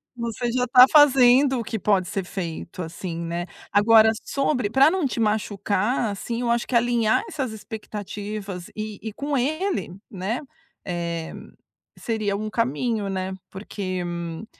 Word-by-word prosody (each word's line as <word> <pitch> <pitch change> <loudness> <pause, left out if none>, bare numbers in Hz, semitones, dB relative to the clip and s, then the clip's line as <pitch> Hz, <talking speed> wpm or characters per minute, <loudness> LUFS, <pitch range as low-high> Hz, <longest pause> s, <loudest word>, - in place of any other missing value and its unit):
Você 235 0 -3
já 250 +1 0
tá 250 +1 +9
fazendo, 265 -2 +6
o - - -3
que 220 0 -4
pode 190 -2 +2
ser 195 +1 -3
feito 180 -1 -6
assim, 165 +1 -6
né. 170 +1 -3 0.2
Agora, 220 +2 +6
sobre 270 -5 0
pra 270 +7 +5
não 365 -5 0
te 245 - -4
machucar, 210 +1 0
assim, 230 +4 -4
eu 240 -1 +1
acho 235 0 0
que 255 - -2
alinhar 235 -2 +2
essas 275 - -3
expectativas 205 -3 -6
e 215 -1 -5
e 220 - -5
com 285 +6 -3
ele, 300 - -1 0.2
né, 195 +5 -3 0.5
eh, 170 -2 -3 0.7
seria 215 -3 -1
um 215 +1 -4
caminho, 230 -2 -1
né, 190 0 -3 0.2
porque, 190 -2 -5
hum 170 +2 -5
215 Hz, 150 wpm, -24 LUFS, 190-245 Hz, 0.7 s, tá